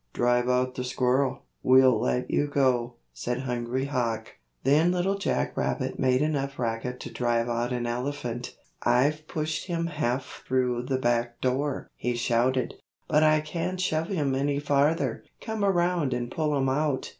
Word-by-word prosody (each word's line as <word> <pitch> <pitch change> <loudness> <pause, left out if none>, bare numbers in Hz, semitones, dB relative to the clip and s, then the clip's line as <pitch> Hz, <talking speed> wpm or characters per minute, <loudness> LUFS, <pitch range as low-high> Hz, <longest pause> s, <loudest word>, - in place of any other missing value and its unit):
"Drive 120 0 +2
out 125 0 +1
the 125 - -4
squirrel; 130 +1 0 0.2
we'll 130 -3 +6
let 125 +1 0
you 145 - +2
go," 125 -4 +1 0.2
said 125 +1 -3
Hungry 125 0 -2
Hawk. 115 -5 -2 0.3
Then 150 +6 +4
Little 180 +2 +1
Jack 200 - -1
Rabbit - - -2
made 130 +1 +3
enough 140 -3 -1
racket 120 +1 -2
to - - -7
drive 120 -1 0
out 120 +1 -1
an 120 -1 -1
elephant. 120 0 -3 0.3
"I've 150 +5 +2
pushed 155 -1 -3
him 170 -2 -1
half 135 -5 -2
through 125 -2 +1
the 130 -1 +1
back 120 -1 0
door," 130 +2 -1
he 125 0 -2
shouted, 120 +2 +1 0.3
"but 150 -1 +3
I 155 0 +5
can't 170 +4 -3
shove 165 -3 0
him 150 -9 0
any 140 +1 0
farther. 145 +3 +1 0.2
Come 220 -2 -3
around 175 -7 +2
and 120 -1 -3
pull 150 -2 0
him 135 -1 +1
out." 140 0 0
130 Hz, 160 wpm, -27 LUFS, 125-150 Hz, 0.3 s, we'll